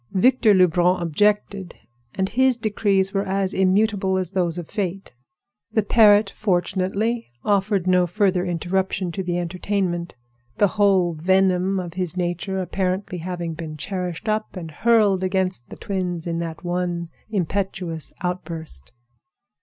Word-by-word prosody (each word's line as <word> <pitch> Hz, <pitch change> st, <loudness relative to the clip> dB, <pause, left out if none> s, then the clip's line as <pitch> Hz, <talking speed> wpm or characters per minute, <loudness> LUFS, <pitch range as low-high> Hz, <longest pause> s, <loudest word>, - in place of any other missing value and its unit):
Victor 225 Hz, +1 st, +4 dB
Lebrun 180 Hz, 0 st, +3 dB
objected; 195 Hz, +2 st, 0 dB, 0.4 s
and 190 Hz, 0 st, 0 dB
his 260 Hz, 0 st, +3 dB
decrees 200 Hz, -3 st, +1 dB
were 195 Hz, -, +1 dB
as 195 Hz, -1 st, -1 dB
immutable 190 Hz, 0 st, +2 dB
as 185 Hz, -2 st, -1 dB
those 180 Hz, -3 st, 0 dB
of 175 Hz, -3 st, -5 dB
Fate. 195 Hz, -, -4 dB, 0.6 s
The 220 Hz, -, +2 dB
parrot 205 Hz, -2 st, +5 dB
fortunately 200 Hz, -, -1 dB, 0.2 s
offered 200 Hz, -2 st, +1 dB
no 180 Hz, -1 st, +3 dB
further 185 Hz, 0 st, +1 dB
interruption 180 Hz, +1 st, -1 dB
to 190 Hz, -, -3 dB
the 175 Hz, -1 st, -2 dB
entertainment, 175 Hz, 0 st, -2 dB, 0.4 s
the 205 Hz, -, +4 dB
whole 190 Hz, -4 st, +3 dB
venom 190 Hz, +3 st, +2 dB
of 175 Hz, -2 st, -6 dB
his 180 Hz, -1 st, -3 dB
nature 180 Hz, +2 st, -2 dB
apparently 185 Hz, 0 st, -2 dB
having 175 Hz, -1 st, -4 dB
been 155 Hz, -1 st, -7 dB
cherished 180 Hz, +2 st, -4 dB
up 215 Hz, 0 st, -1 dB
and 165 Hz, -3 st, -6 dB
hurled 210 Hz, 0 st, +3 dB
against 185 Hz, -8 st, -1 dB
the -, -, -8 dB
twins 180 Hz, -4 st, -3 dB
in 170 Hz, -1 st, -2 dB
that 165 Hz, 0 st, -5 dB
one 175 Hz, -1 st, -2 dB, 0.2 s
impetuous 185 Hz, -4 st, -3 dB
outburst. 165 Hz, -, -4 dB
185 Hz, 135 wpm, -22 LUFS, 175-200 Hz, 0.6 s, parrot